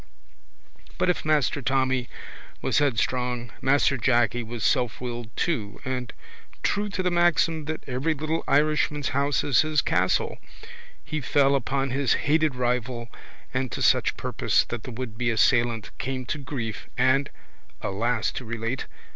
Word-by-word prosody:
But 180 - +3
if 175 - -4
Master 150 -2 +1
Tommy 130 -2 +1 0.5
was - - +1
headstrong 125 -3 0
Master 140 0 +3
Jacky 120 0 +2
was 115 -1 -6
selfwilled 120 -2 -1
too 115 - -1
and, 125 -2 -3 0.5
true 205 +1 0
to 195 -2 -2
the 180 - +1
maxim 165 -2 +2
that 155 +1 -4
every 140 +5 0
little 155 +3 -2
Irishman's 150 0 +2
house 140 +1 +1
is 145 - +4
his 155 0 +1
castle, 90 +2 +1 0.7
he 155 -1 -3
fell 140 +1 +3
upon 135 0 0
his 135 0 +2
hated 155 -1 +3
rival 125 -1 -1 0.4
and 130 -2 -1
to - - -2
such - - +3
purpose - - +1
that 120 -2 -4
the 130 - -6
wouldbe 120 0 -3
assailant 115 -1 +2
came 130 0 -3
to 150 - -3
grief 125 -6 -5
and 135 +2 +3 0.5
(alas 110 +3 0
to - - -6
relate!) 115 +2 -3
130 Hz, 140 wpm, -26 LUFS, 120-145 Hz, 0.7 s, is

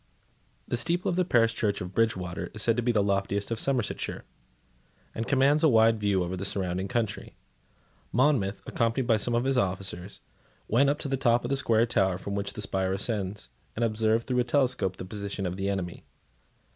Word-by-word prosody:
The 120 - -1
steeple 170 +7 0
of 175 - 0
the 180 - +2
parish 115 -8 +3
church 105 -3 -1
of 90 +1 -6
Bridgewater 95 -6 -1
is 105 - -1
said 115 - +3
to 120 - 0
be 120 +1 +1
the 105 -3 +2
loftiest 100 +1 -1
of 115 - -1
Somersetshire, 130 -5 -2 0.9
and 115 - -4
commands 145 +3 +3
a 160 - +6
wide 115 -2 +4
view 100 -3 +1
over 90 +1 -3
the 95 - -5
surrounding 95 -1 -2
country. 115 -3 -3 0.8
Monmouth, 125 -6 +1
accompanied 115 +3 0
by 115 -2 +3
some 115 +3 0
of 120 - +1
his 135 -1 +2
officers, 95 -1 -3 0.5
went 135 +5 +3
up 145 - +1
to - - -5
the 135 0 -1
top 120 -2 +2
of - - -3
the 140 - +1
square 115 -4 +3
tower 95 -5 +1
from 100 +1 -6
which 100 0 -3
the 105 - -5
spire 95 -1 -1
ascends, 100 - -3 0.3
and 115 - +1
observed 110 +1 +1
through 125 -1 0
a - - +4
telescope 125 -7 +1
the - - -6
position 100 0 -5
of 90 0 -2
the 95 +1 -2
enemy. 90 -3 -4
110 Hz, 200 wpm, -28 LUFS, 95-120 Hz, 0.9 s, a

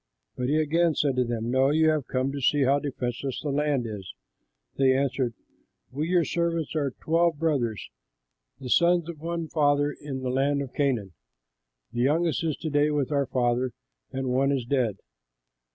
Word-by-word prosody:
But 125 0 -2
he 150 - +2
again 165 +1 +2
said 140 -3 +1
to 125 - +4
them, 120 -1 -3
"No, 130 +1 +3
you 160 +2 +4
have 155 -4 0
come 130 +1 -1
to 140 0 -5
see 145 +2 +3
how 140 +2 +3
defenseless 130 -2 -3
the 150 - -3
land 145 -3 0
is." 100 -5 -7 0.6
They 130 -1 +3
answered, 130 -3 -1 0.6
"We, 150 +5 -2
your 175 -3 +3
servants, 170 -2 -1
are 140 -4 -1
twelve 165 0 +2
brothers, 135 -9 -1 0.7
the 130 -3 -6
sons 170 -1 +4
of 165 -3 -7
one 165 +1 -3
father 145 -2 +2
in 140 -3 -7
the 125 - -1
land 140 +2 +1
of 130 - -9
Canaan. 120 -10 0 0.8
The 120 - -1
youngest 160 +5 +1
is 160 -3 -1
to 155 - -3
day 145 +1 +3
with 145 -2 -1
our 140 -2 +1
father, 125 0 0 0.4
and 130 -1 -3
one 135 +2 +2
is 135 -4 -1
dead." 120 -6 0
140 Hz, 180 wpm, -26 LUFS, 130-155 Hz, 0.8 s, to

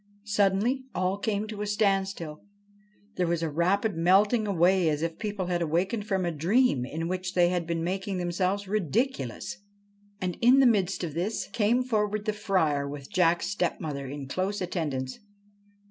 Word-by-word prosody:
Suddenly 210 +6 +1
all 185 +2 0
came 205 0 -1
to 210 -1 -6
a 210 - -2
standstill. 195 -6 0 0.8
There 180 - +1
was 170 -1 0
a 160 - -1
rapid 185 +6 +1
melting 205 +6 +3
away 180 -2 +3
as 150 +1 -1
if 165 -1 -3
people 205 -4 -3
had 175 -1 -1
awakened 185 +7 0
from 190 -4 0
a 170 - 0
dream 170 - +2
in 165 +3 -3
which 185 +1 -3
they 175 -1 +5
had 175 -2 -1
been 165 -1 -1
making 190 +2 -2
themselves 185 +3 -1
ridiculous. 205 - -1 0.6
And, 180 -2 -3
in 250 +3 +6
the 270 - +6
midst 195 -6 +2
of 160 -4 -3
this, 185 +7 -2
came 235 +4 +2
forward 210 -3 -1
the 215 - 0
Friar 160 -9 0
with 140 -1 -8
Jack's 175 -2 +3
stepmother 155 -7 -2
in 140 0 -6
close 190 +7 -2
attendance. 150 -8 -3
185 Hz, 165 wpm, -27 LUFS, 165-205 Hz, 0.8 s, in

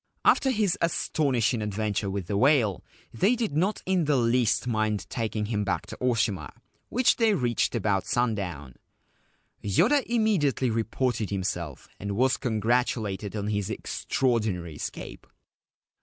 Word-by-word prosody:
After 270 - +4
his 210 -7 +1
astonishing 130 -8 +1
adventure 105 -1 -2
with 95 -1 -3
the 100 - -3
whale, 115 - +3 0.3
they 195 - +3
did 225 -11 -2
not 190 +7 0
in 185 -3 +1
the 145 -1 +2
least 120 -1 +2
mind 110 -3 -1
taking 110 -2 -2
him 105 -1 -1
back 95 - -1
to - - -9
Oshima, 110 -9 0 0.4
which 250 +1 +3
they 225 -4 +3
reached 120 - 0
about 100 -3 0
sundown. 100 - -2 0.9
Yoda 215 - +3
immediately 195 - +1
reported 115 0 -1
himself, 90 -7 -3
and 100 +1 -3
was 130 +3 +2
con 115 -5 -2
gratulated 110 -3 0
on 100 -1 -2
his 105 -1 -1
extraordinary 110 -7 -1
escape. 75 - -7
115 Hz, 135 wpm, -27 LUFS, 100-140 Hz, 0.9 s, After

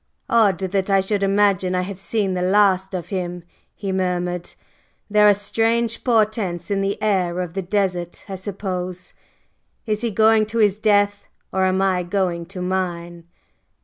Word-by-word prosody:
"Odd 215 -6 +4
that 190 +1 -2
I 195 0 +4
should 200 +1 -1
imagine 195 -2 +2
I 180 - 0
have 195 0 -7
seen 195 -1 -1
the 180 - -2
last 190 0 +2
of 175 - -5
him!" 180 -3 -4 0.3
he 195 -2 -4
murmured. 180 -2 -2 0.6
"There 210 0 +6
are - - +7
strange 225 +3 0
portents 215 -6 0
in 195 -1 +1
the 195 +1 -1
air 185 -4 +1
of 180 -2 -4
the 195 - -2
desert, 180 -2 -2
I 195 - -6
suppose! 185 -2 -5 0.7
Is 215 -2 -1
he 235 - 0
going 220 0 +4
to 225 +2 -4
his 210 -2 +3
death? 205 -1 +2 0.3
Or 190 0 +2
am 190 +1 +1
I 185 -2 +2
going 175 -2 -2
to 185 -1 -6
mine?" 175 -2 -3
195 Hz, 165 wpm, -21 LUFS, 180-205 Hz, 0.7 s, are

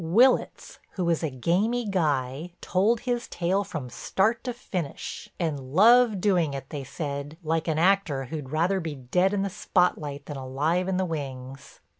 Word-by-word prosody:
Willitts, 235 +11 +2
who 185 - -2
was 170 -2 +1
a 160 - -1
gamy 195 - 0
guy, 150 -3 -1
told 210 +5 +1
his 245 -1 -2
tale 185 +3 0
from 155 -8 -6
start 220 - 0
to 250 - -1
finish, 185 - -5
and 160 -5 -1
loved 210 - +5
doing 175 -8 +2
it, 135 0 -7
they 145 -2 -4
said, 145 +1 -5
like 160 +1 -1
an 160 -2 0
actor 170 -6 +2
who'd 145 0 -6
rather 170 +6 +1
be 160 -4 -4
dead 180 +9 +1
in 200 -1 0
the - - 0
spotlight 150 -7 0
than 145 - -6
alive 150 +8 0
in 190 -1 0
the 190 - +1
wings. 135 -4 -7
165 Hz, 170 wpm, -26 LUFS, 140-195 Hz, -, loved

